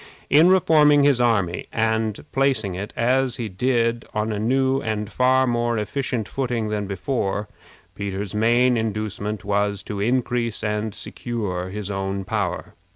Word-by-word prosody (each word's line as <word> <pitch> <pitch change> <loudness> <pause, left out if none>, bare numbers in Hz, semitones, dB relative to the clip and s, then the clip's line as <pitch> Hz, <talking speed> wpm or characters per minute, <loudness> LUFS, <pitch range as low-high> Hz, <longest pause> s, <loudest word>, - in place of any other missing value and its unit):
In 160 +5 +7
reforming 150 -5 +5
his 140 -4 +4
army, 100 -8 +1
and 110 -1 -1
placing 130 -8 +1
it, 95 +3 -5
as 130 +1 +2
he 115 - -3
did, 115 +3 0
on 110 +1 0
a 105 - -2
new 130 +4 +1
and 105 -1 -2
far 130 +1 +3
more 120 -1 0
efficient 110 +1 -2
footing 120 -5 -2
than 105 -1 -2
before, 100 0 -2 0.5
Peter's 100 0 -4
main 120 +3 +3
inducement 105 -1 -3
was 100 -1 0
to 105 -1 -5
increase 120 0 0
and 105 0 -2
secure 100 -7 -4
his 100 0 -5
own 95 0 -3
power. 100 -4 -3
110 Hz, 145 wpm, -23 LUFS, 100-125 Hz, 0.5 s, In